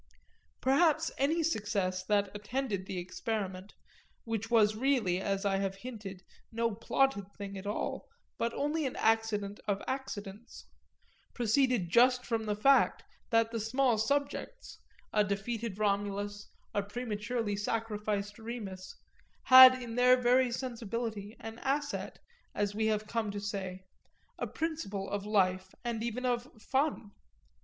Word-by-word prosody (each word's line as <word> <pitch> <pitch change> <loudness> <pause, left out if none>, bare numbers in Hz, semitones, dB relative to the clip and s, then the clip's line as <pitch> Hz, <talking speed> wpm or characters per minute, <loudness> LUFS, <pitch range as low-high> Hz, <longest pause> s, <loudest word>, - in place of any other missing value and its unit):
Perhaps 315 +4 +3
any 315 +5 +2
success 205 - -1
that 205 -1 +1
attended 210 -2 -3
the 190 - -4
experiment 190 +1 -4 0.5
which 225 -1 -3
was 215 -3 +4
really, 220 -8 +1
as 195 +1 -1
I 195 -1 +2
have 195 0 -1
hinted, 195 -4 -8 0.3
no 230 0 0
plotted 215 -2 0
thing 200 -1 -6
at 195 +1 -7
all, 205 - -3 0.3
but 235 - 0
only 295 +1 0
an 255 - -5
accident 220 -2 +1
of 200 -1 +1
accidents 235 -5 -6 0.7
proceeded 240 -4 +2
just 250 +3 +5
from 225 -2 -1
the 210 - 0
fact 270 +6 +4 0.3
that 225 0 +3
the 230 - -2
small 240 +1 +2
subjects, 285 - -2 0.3
a 210 - +4
defeated 205 +1 -3
Romulus, 205 0 -1 0.2
a 205 - +1
prematurely 215 0 -3
sacrificed 210 -1 -2
Remus, 215 -5 -7 0.5
had 255 0 +10
in 240 -2 -6
their 250 +1 +5
very 250 0 +3
sensibility 230 -3 -4
an 225 +1 -8
asset, 285 +1 -2 0.4
as 205 0 0
we 220 +1 0
have 215 -1 0
come 220 0 -2
to 205 0 -4
say, 190 -2 -5 0.6
a - - -2
principle 255 -12 -3
of 205 0 -4
life 185 -2 +1
and 235 -2 -2
even 235 +2 -3
of 245 +1 0
"fun." 265 -3 -1
220 Hz, 135 wpm, -31 LUFS, 200-250 Hz, 0.7 s, had